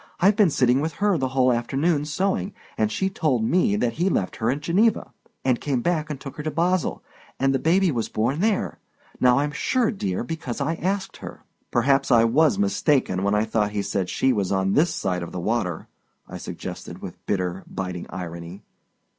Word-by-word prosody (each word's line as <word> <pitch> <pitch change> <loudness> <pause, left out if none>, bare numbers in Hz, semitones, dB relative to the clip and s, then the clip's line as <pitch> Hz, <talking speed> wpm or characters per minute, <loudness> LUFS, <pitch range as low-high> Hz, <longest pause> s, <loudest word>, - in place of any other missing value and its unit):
"I've 195 +3 +5
been 200 -4 +5
sitting 130 -2 +3
with 160 +1 -2
her 205 -1 +1
the 130 -5 0
whole 130 -1 +3
afternoon, 145 +6 0
sewing, 195 +6 -1 0.2
and 110 -1 0
she 190 - 0
told 155 -11 0
me 115 - +2
that 115 +3 0
he 185 - +3
left 95 - -1
her 110 - 0
at 140 +4 -1
Geneva, 195 +8 +1 0.3
and 125 -2 +2
came 130 -5 -1
back 160 -3 0
and 145 -3 -4
took 135 -1 -9
her - - -3
to 155 - -2
Basle, 175 +2 0 0.4
and 135 0 +2
the 135 - +1
baby 180 +4 +3
was 115 -5 -2
born 120 +8 0
there—now 180 - 0
I'm 145 +1 +1
sure, 245 +9 +1
dear, 100 - -2
because 150 -3 -5
I 145 +3 0
asked 190 +4 -2
her." - - -10 0.3
"Perhaps 135 +3 +2
I 115 -3 +6
was 150 - +3
mistaken 150 - +1
when 100 +1 +1
I 105 +1 +2
thought 105 -2 0
he 100 -1 -1
said 95 -2 -2
she 130 - +2
was 100 -4 -1
on 95 0 +1
this 165 +4 +3
side 90 -1 -2
of 85 - -6
the 90 - -3
water," 90 -4 -2 0.4
I - - -7
suggested, - - -7
with - - -9
bitter, 90 -1 -1
biting 90 -2 -5
irony. 85 +1 -7
135 Hz, 195 wpm, -24 LUFS, 105-165 Hz, 0.4 s, I